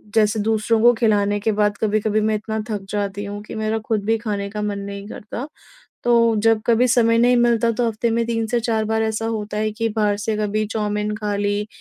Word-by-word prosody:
जैसे 215 0 +3
दूसरों 220 +1 +1
को 240 +1 +7
खिलाने 205 -3 +1
के 220 +2 0
बाद 205 -1 +1
कभी-कभी 215 0 +1
मैं 215 0 +1
इतना 220 +1 -3
थक 205 -2 -4
जाती 205 -1 -3
हूँ 205 0 -6
कि 215 - -9
मेरा 220 0 -1
खुद 215 -3 -1
भी 225 +1 +2
खाने 205 -3 -3
का 210 0 -5
मन 205 -1 -2
नहीं 200 0 -7
करता। 230 +6 -7 0.6
तो 230 -2 +4
जब 225 -1 +4
कभी 240 +2 +3
समय 230 -1 +3
नहीं 245 +1 +4
मिलता 235 -1 +3
तो 235 +1 0
हफ्ते 230 +1 -1
में 230 0 +1
3 225 -1 -1
से 240 +1 0
4 220 -2 0
बार 220 0 0
ऐसा 220 0 -2
होता 210 -2 -3
है 215 0 0
कि 225 +1 -2
बाहर 205 -2 +1
से 215 +1 -2
कभी 215 0 -1
चाऊमीन 210 -1 -1
खा 210 -1 -2
ली, 205 +1 -1
215 Hz, 225 wpm, -21 LUFS, 210-225 Hz, 0.6 s, को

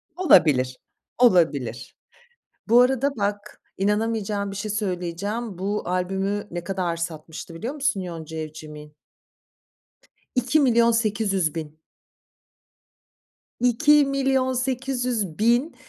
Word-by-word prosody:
Olabilir, 145 - +4 0.4
olabilir. 160 - +2 0.7
Bu 240 +2 +7
arada 265 +2 +2
bak, 205 0 -3 0.2
inanamayacağın 210 0 -1
bir 195 - -7
şey 210 +1 -4
söyleyeceğim. 200 +1 -3
Bu 205 +2 -2
albümü, 195 +3 -2
ne 175 0 -5
kadar 180 -2 -2
satmıştı 165 0 -6
biliyor 235 - -5
musun 280 -8 0
Yonca 165 -3 -7
Evcimik'in? 150 -1 -9 1.4
2.800.000. 220 - +1 1.8
2.800.000 255 - +1
205 Hz, 75 wpm, -24 LUFS, 170-245 Hz, 1.8 s, Bu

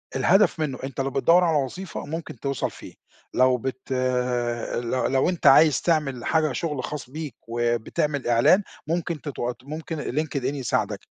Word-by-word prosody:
الهدف 180 - +3
منُّه، 140 -5 -1
أنت 135 0 -3
لو 135 - -1
بتدوّر 165 +6 +4
على 165 -3 +3
وظيفة 165 +8 -4
ممكن 155 -5 -6
توصل 140 -3 -2
فيه، - - -12 0.4
لو 130 0 +4
بت 130 +2 -6
ال 125 -2 -1
لو 130 - 0
لو 135 +5 +2
أنت 175 -5 0
عايز 140 0 +6
تعمل 150 -7 0
حاجة 155 -3 +2
شُغل 150 -3 -3
خاص 145 -3 -6
بيك، 150 -3 -6
وبتعمل 120 +4 -1
إعلان 120 - +5 0.2
ممكن 170 -1 -2
تتوات 125 -4 -4
ممكن 155 +3 -6
Linked 150 +1 -1
in - - -5
يساعدك، 135 -3 -1
135 Hz, 160 wpm, -24 LUFS, 125-155 Hz, 0.4 s, عايز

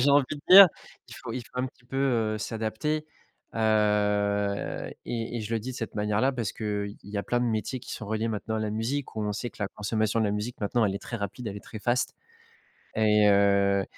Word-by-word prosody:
j'ai 135 - +4
envie 140 -1 +5
de 150 -2 -4
dire. 195 +1 +12 0.4
Il 115 - -10
faut 125 -5 -7
il 125 0 -4
faut 125 - -9
un 130 - +1
petit 125 -1 -15
peu, 135 +2 -7
heu, 115 -5 +1
s'adapter. 115 +9 -2 0.5
Heu 105 -2 +1
et 115 0 -3
et - - -2
je 110 +2 -5
le 115 - +2
dis 130 +4 -6
de - - -8
cette 115 -3 -5
manière-là 105 +5 +2
parce 115 -6 -3
qu'il 105 -2 -3
y 100 +1 -7
a - - -1
plein 120 +3 0
de - - +1
métiers 115 +2 -2
qui - - -10
sont 110 - -6
reliés, 110 +2 -1
maintenant, 110 +1 -3
à - - -1
la 105 -1 -1
musique 115 +4 -3
où 110 - -1
on 105 0 -1
sait 120 +4 -4
que - - -21
la 100 - -1
consommation 110 +1 -1
de - - +2
la 100 - 0
musique 105 +4 -4
maintenant, 110 +3 +1
elle 95 - -1
est - - -5
très 115 - -5
rapide, 105 +3 -5
elle 100 - -6
est - - -7
très 110 - -9
fast. 120 +2 0 0.8
Et 105 -1 +4
heu, 100 -1 +4
110 Hz, 240 wpm, -27 LUFS, 105-120 Hz, 0.8 s, dire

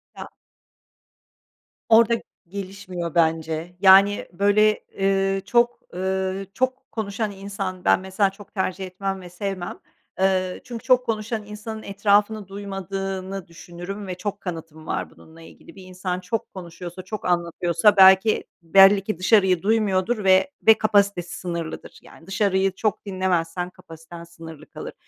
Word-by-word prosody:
Ya. - - -9 1.6
Orada 230 +1 +6 0.3
gelişmiyor 185 -3 -6
bence, 160 +1 0
yani, 195 +1 +6
böyle, 210 +3 +3
eee, 195 0 0
çok, 240 0 +2
ııı, 190 +1 -2
çok 260 +4 -2
konuşan 215 0 -3
insan 195 -2 -6
ben - - +5
mesela 190 +1 0
çok 200 +1 -15
tercih 190 -1 -2
etmem 190 +1 -4
ve 180 - -10
sevmem. 185 0 -5 0.4
Iıı, 185 -1 +1
çünkü 240 -1 -8
çok 255 -1 +3
konuşan 220 -1 -2
insanın 220 +1 -8
etrafını 205 +1 +1
duymadığını 195 -1 -5
düşünürüm 175 +4 -8
ve 180 - -4
çok 200 +2 -5
kanıtım 165 -3 -7
var - - -3
bununla 160 +1 -17
ilgili. 165 - -15
Bir 190 - -12
insan 185 0 -4
çok 220 +5 -4
konuşuyorsa, 175 0 -8
çok 185 +3 -7
anlatıyorsa 175 +3 +2
belki 190 +3 +6 0.2
belli 195 +4 +6
ki 205 -3 -3
dışarıyı 185 -2 +3
duymuyordur 210 0 +1
ve 190 +8 +4 0.3
kapasitesi 200 -4 +1
sınırlıdır. 170 -3 -6
Yani 165 - -17
dışarıyı 195 -1 +1
çok 215 -1 -2
dinlemezsen 180 -2 -1
kapasiten 165 0 -12
sınırlı 165 -2 -12
kalır. - - -8
190 Hz, 130 wpm, -23 LUFS, 180-205 Hz, 1.6 s, Orada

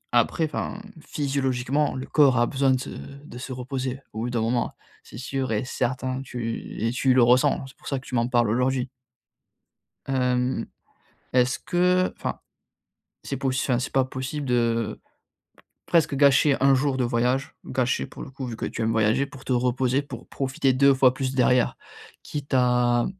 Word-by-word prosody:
après, 140 +7 +3
enfin, 170 +5 -4 0.2
physiologiquement, 140 0 -1
le 130 - -4
corps 140 -5 +4
a 120 - +4
besoin 135 +1 +1
de 130 - +2
se - - -6
de 140 -3 -10
se 130 - -7
reposer 130 +1 -4
au 110 - -5
bout 120 +2 -2
d'un 120 -2 -1
moment, 120 +2 0 0.3
c'est 110 - -12
sûr 130 0 -3
et 110 +4 -1
certain, 130 +1 -2
tu 120 -3 -5
et 115 - +1
tu 130 +1 +2
le 125 - +6
ressens, 130 +3 +3
c'est 135 - -15
pour - - -14
ça 140 - -1
que 135 - -17
tu - - -11
m'en 115 0 +2
parles 120 -3 +2
aujourd'hui. 125 +1 0 1.2
Hem, 125 -1 0 0.7
est-ce 125 0 +2
que, 180 +1 +2
enfin, - - -4 0.8
c'est - - -4
poss 135 -1 -1
enfin, 125 -3 +1
c'est 125 - -4
pas 135 -1 +3
possible 135 +3 -5
de 115 -3 0 0.9
presque 160 -4 +2
gâcher 140 0 +5
1 135 0 +5
jour 135 0 +1
de 130 - +1
voyage? 125 +3 0
Gâcher 130 -1 0
pour - - -10
le - - -9
coup, 135 -1 -6
vu 115 -2 -5
que - - -5
tu - - -5
aimes 110 0 +1
voyager, 110 +5 +2
pour 135 -1 -13
te 130 - -1
reposer, 125 +2 +1
pour 130 -4 -10
profiter 135 0 0
2 140 +1 +5
fois 130 -1 +5
plus 130 0 -3
derrière, 125 -1 +3 0.5
quitte 145 -2 -5
à 125 -1 +3
130 Hz, 180 wpm, -25 LUFS, 125-135 Hz, 1.2 s, le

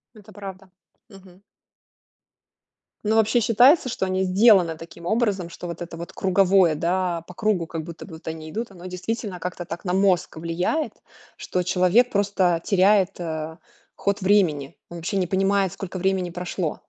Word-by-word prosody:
Это 215 0 -15
правда. 195 -2 -9 0.4
Мгм. 190 -1 -16 1.6
Ну, 220 +1 +2
вообще 220 +2 +3
считается, 250 +6 +5
что 190 - -2
они 185 0 0
сделаны 185 -4 +4
таким 170 +1 -12
образом, 200 -4 0
что 175 - -8
вот 170 0 -7
это 170 -1 -7
вот 170 - -8
круговое, 190 -2 +3
да, 175 +1 -1
по 180 - -10
кругу, 195 -5 0
как 160 -2 -5
будто 170 0 -9
бы 170 - -12
вот 160 - -12
они 160 -1 -7
идут, 225 +3 -4
оно 180 -1 -12
действительно 185 +1 -4
как-то 180 0 -5
так 170 +1 -7
на 180 - -2
мозг 185 -4 +2
влияет, 175 - -1 0.4
что 180 -1 -2
человек 185 +7 +3
просто 190 -4 +1
теряет, 195 -1 +3
а, 160 -1 -4 0.4
ход 200 0 -1
времени, 175 -8 +2
он 170 - -8
вообще 195 +4 -2
не 180 -2 0
понимает, 195 0 +1
сколько 190 -1 -6
времени 190 -1 0
прошло. 175 -2 -3
185 Hz, 165 wpm, -23 LUFS, 170-200 Hz, 1.6 s, считается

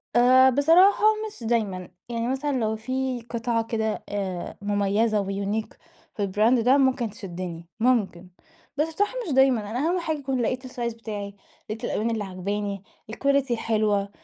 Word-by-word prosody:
آآ، 255 +2 +7
بصراحة 330 - +5 0.2
مش 330 - -11
دايمًا. 200 -6 -1 0.2
يعني 235 0 -2
مثلًا 270 +3 -1
لو 220 -1 0
في 255 +2 -3
قطعة 235 -1 -1
كده 220 -1 -2
آآ، 190 -4 -4
مميّزة 205 +1 +1
وunique 200 +2 -3 0.4
في 205 -2 -1
الbrand 220 +5 +3
ده 260 +3 +5
ممكن 260 -4 +2
تشدّني، 175 -4 -7
ممكن، 205 -7 +1 0.5
بس 305 +2 +2
بصراحة 410 +7 0
مش 285 - -1
دايمًا. 250 -6 +3
أنا 245 - -2
أهم 345 +5 +1
حاجة 315 -2 -2
يكون 265 -3 -2
لقيت 255 +2 -2
الsize 240 -2 -4
بتاعي، 205 -3 -6 0.3
لقيت 225 +3 -5
الألوان 225 0 -1
اللي 220 -2 -1
عاجباني، 200 +1 -4 0.3
الquality 275 +1 +1
الحلوة، 215 -3 +1
230 Hz, 150 wpm, -25 LUFS, 205-260 Hz, 0.5 s, آآ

